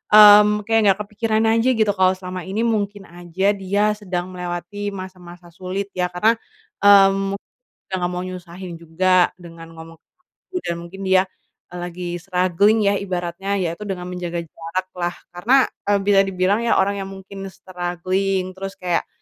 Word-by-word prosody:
mmm, 210 0 +8
kayak 225 +2 +2
nggak 195 0 +4
kepikiran 215 +1 -1
aja 230 +3 +3
gitu, 215 -2 +2
kalau 185 -1 +3
selama 185 0 -6
ini 200 +4 -2
mungkin 205 -3 -1
aja 175 +3 -1
dia 200 +1 0
sedang 185 -3 -4
melewati 180 +3 -5
masa-masa 180 -2 -10
sulit 190 +3 -5
ya, 180 -1 -1
karena, 180 +5 +2 0.5
mmm, 195 -1 +5
mungkin 200 - -11 0.5
nggak 180 -1 -1
mau 180 0 -3
nyusahin 180 0 -8
juga, 175 +2 +2
dengan 165 -1 -12
ngomong 165 0 -12
ke - - -78
aku, 375 - -20
dan 170 - -1
mungkin 175 +3 -11
dia, 190 0 +5 0.5
eee, 180 - -7
lagi 175 0 -6 0.2
struggling 185 +4 +2
ya - - +1
ibaratnya, 185 0 -3
ya 185 -4 0
itu 170 +5 -8
dengan 185 -2 -4
menjaga 175 -1 -4
jarak 165 +3 -5
lah, 175 0 -1 0.2
karena, 205 +9 +2 0.3
eee, 205 0 +3
bisa 200 0 +4
dibilang 190 +2 +1
ya, - - +3
orang 200 +1 +1
yang 195 - -4
mungkin 195 0 -9
struggling, 185 +1 -2
terus 195 +1 -7
kayak, 180 -3 -1
185 Hz, 165 wpm, -21 LUFS, 175-200 Hz, 0.5 s, mmm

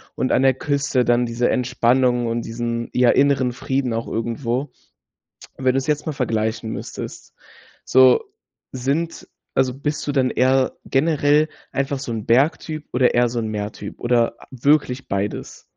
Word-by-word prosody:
und 130 - 0
an - - +3
der 135 0 +5
Küste 140 -2 0
dann 120 0 +3
diese 120 +1 0
Entspannung 125 -1 +2
und 115 +1 -1
diesen, 115 0 -3
ja, 125 -1 +3
inneren 135 -2 +3
Frieden 130 -1 -2
auch 115 0 -3
irgendwo“. 120 +4 -2 0.9
Wenn 130 -1 +2
du - - +2
es 135 - -3
jetzt 150 -1 -1
mal 155 - -1
vergleichen 110 -3 -2
müsstest, - - -7 0.5
so 130 - +5 0.5
sind 140 +6 -2 0.3
also, 130 -1 +2
bist 145 +2 -3
du 145 - -1
dann 130 -2 +2
eher 130 +1 +2
generell 150 +1 +2 0.2
einfach 140 0 -1
so 130 - -5
'n 110 -2 -4
Berg-Typ 150 +5 +1
oder 125 0 +3
eher 120 0 +4
so 120 +1 -4
'n 110 - -3
Meer-Typ 105 -1 -5
oder 120 -1 +1 0.2
wirklich 135 0 +1
beides? 100 +1 -4
125 Hz, 155 wpm, -21 LUFS, 120-140 Hz, 0.9 s, der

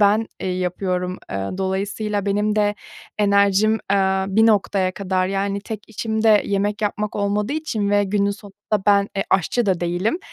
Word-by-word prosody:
ben, 210 +2 +4
eee, 190 - -2
yapıyorum. 180 0 -2
Eee, 95 0 -3
dolayısıyla 200 +2 -2
benim 210 +1 +1
de 205 0 +2 0.4
enerjim, 200 +1 +3 0.2
eee, 190 -1 +2
bir 220 +3 +4
noktaya 195 -3 +2
kadar, 185 -1 -1
yani, 195 +1 -1
tek 215 0 -8
işim 220 0 -3
de 215 -2 +5
yemek 205 +1 -1
yapmak 210 0 -2
olmadığı 205 +4 0
için 225 -10 -2
ve 205 0 +3
günün 200 +1 +1
sonunda 205 0 -4
ben 200 0 +4
e, - - +1
aşçı 200 +5 +1
da 185 -3 +1
değilim. 175 - 0
200 Hz, 165 wpm, -21 LUFS, 190-210 Hz, 0.4 s, de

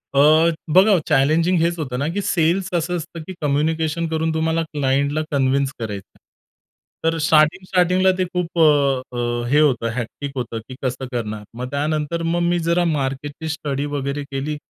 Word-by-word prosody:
अ, 155 +4 +5 0.2
बघा 195 +2 +6
चॅलेंजिंग 155 +5 +3
हेच 170 +1 +1
होतं 130 -5 -3
ना, 145 - -1
की 205 - -1
सेल्स 175 +1 +1
असं 175 +1 0
असतं, 165 0 -7
की 190 - -6
कम्युनिकेशन 160 +3 0
करून 160 0 -1
तुम्हाला 160 +1 0
क्लायंटला 140 +1 +1
कन्विन्स 135 0 +1
करायचं 105 -4 -5
आहे. - - -25 0.8
तर 165 0 +1
स्टार्टिंग-स्टार्टिंगला 180 +4 +3
ते 185 - +1
खूप 175 -1 -2
अ, - - +6 0.5
अ, 120 0 -1
हे 145 - +4
होतं, 125 -6 +2
हेक्टिक 125 +3 -5
होतं, 120 -3 -4
की 130 - -7
कसं 130 0 -2
करणार. 110 -3 -4
मग 125 +1 -4
त्यानंतर 155 +3 -1
मग 175 - 0
मी 175 - +1
जरा 170 +1 +1
मार्केटची 145 +1 -3
स्टडी 145 -3 -3
वगैरे 140 +1 -3
केली, 140 +3 -3
155 Hz, 165 wpm, -21 LUFS, 135-170 Hz, 0.8 s, बघा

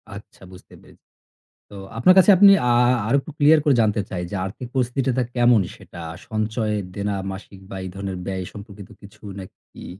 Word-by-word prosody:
আচ্ছা 100 -1 -14
বুঝতে 90 - -15
পেরে - - -19 0.7
তো - - -13 0.2
আপনার 180 +11 +5
কাছে 190 +2 +7
আপনি 200 +1 +8 0.2
আ - - +4 0.4
আরও 120 - +2
একটু 155 - -10
clear 150 +2 +6
করে 145 -3 +3
জানতে 105 -1 +1
চাই 90 -1 -4
যে, - - -4
আর্থিক 110 +6 -7
পরিস্থিতিটা 130 0 0
কেমন 120 -3 +4
সেটা? 95 -5 -12 0.3
সঞ্চয়, 110 0 -2 0.2
দেনা, 100 0 -2 0.2
মাসিক 95 0 -11
বা - - -8
এই 95 - -6
ধরনের 95 -1 -5
ব্যয় 95 -1 -4
সম্পর্কিত 100 -2 -11
কিছু 100 +1 -17 0.2
নাকি? 95 - -13
105 Hz, 175 wpm, -22 LUFS, 100-125 Hz, 0.7 s, আপনি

